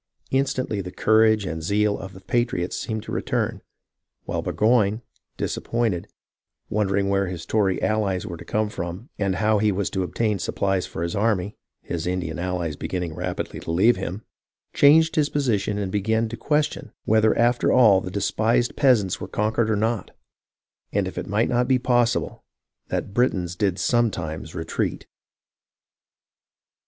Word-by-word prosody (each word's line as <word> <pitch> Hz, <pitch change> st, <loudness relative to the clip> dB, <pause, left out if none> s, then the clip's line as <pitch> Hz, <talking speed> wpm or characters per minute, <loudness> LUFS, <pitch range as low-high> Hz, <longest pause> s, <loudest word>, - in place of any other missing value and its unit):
Instantly 130 Hz, -6 st, 0 dB
the 90 Hz, -1 st, -7 dB
courage 110 Hz, 0 st, +3 dB
and 80 Hz, -2 st, -4 dB
zeal 105 Hz, +4 st, +1 dB
of 95 Hz, -1 st, -8 dB
the 95 Hz, -, -12 dB
patriots 110 Hz, -4 st, -1 dB
seemed 110 Hz, -1 st, -3 dB
to -, -, -8 dB
return; -, -, -1 dB, 0.6 s
while -, -, -2 dB
Burgoyne, 110 Hz, 0 st, +2 dB, 0.3 s
disappointed, 115 Hz, -7 st, -1 dB, 0.6 s
wondering 100 Hz, -1 st, +1 dB
where 100 Hz, 0 st, +1 dB
his 85 Hz, -2 st, -6 dB
Tory 100 Hz, -2 st, +1 dB
allies 100 Hz, -3 st, 0 dB
were 85 Hz, -5 st, -6 dB
to -, -, -10 dB
come 110 Hz, 0 st, 0 dB
from 90 Hz, +6 st, -6 dB
and 100 Hz, -2 st, 0 dB
how 105 Hz, +2 st, +2 dB
he 105 Hz, 0 st, +3 dB
was 100 Hz, 0 st, -2 dB
to 95 Hz, -, -1 dB
obtain 105 Hz, +2 st, -1 dB
supplies 95 Hz, +1 st, -1 dB
for 85 Hz, -, -5 dB
his 85 Hz, -, -2 dB
army, 105 Hz, -2 st, 0 dB, 0.2 s
— -, -, -60 dB
his 85 Hz, 0 st, -2 dB
Indian 90 Hz, -3 st, -2 dB
allies 90 Hz, -3 st, -2 dB
beginning 90 Hz, +1 st, -3 dB
rapidly 90 Hz, +2 st, -4 dB
to -, -, -9 dB
leave 95 Hz, +9 st, +4 dB
him, 95 Hz, +3 st, -5 dB, 0.3 s
— -, -, -57 dB
changed 160 Hz, +3 st, +5 dB
his 150 Hz, -2 st, +3 dB
position 110 Hz, -8 st, 0 dB
and 100 Hz, -2 st, -2 dB
began 110 Hz, +3 st, +1 dB
to 115 Hz, -, -5 dB
question 150 Hz, +4 st, -1 dB
whether 110 Hz, 0 st, +3 dB
after 120 Hz, +1 st, +3 dB
all 105 Hz, -7 st, +6 dB
the 90 Hz, -, -5 dB
despised 110 Hz, +5 st, +1 dB
peasants 115 Hz, -10 st, +3 dB
were -, -, -4 dB
conquered 110 Hz, +1 st, 0 dB
or 110 Hz, -, +2 dB
not, 110 Hz, +1 st, -1 dB, 0.8 s
and -, -, 0 dB
if -, -, -7 dB
it -, -, -4 dB
might 105 Hz, +3 st, +1 dB
not 120 Hz, 0 st, +1 dB
be 130 Hz, -1 st, +4 dB
possible 120 Hz, -2 st, +1 dB, 0.4 s
that -, -, -3 dB
Britons 95 Hz, -7 st, +1 dB
did 95 Hz, -2 st, 0 dB
sometimes 90 Hz, -7 st, -1 dB
retreat. 80 Hz, 0 st, -2 dB
105 Hz, 160 wpm, -24 LUFS, 90-115 Hz, 0.8 s, all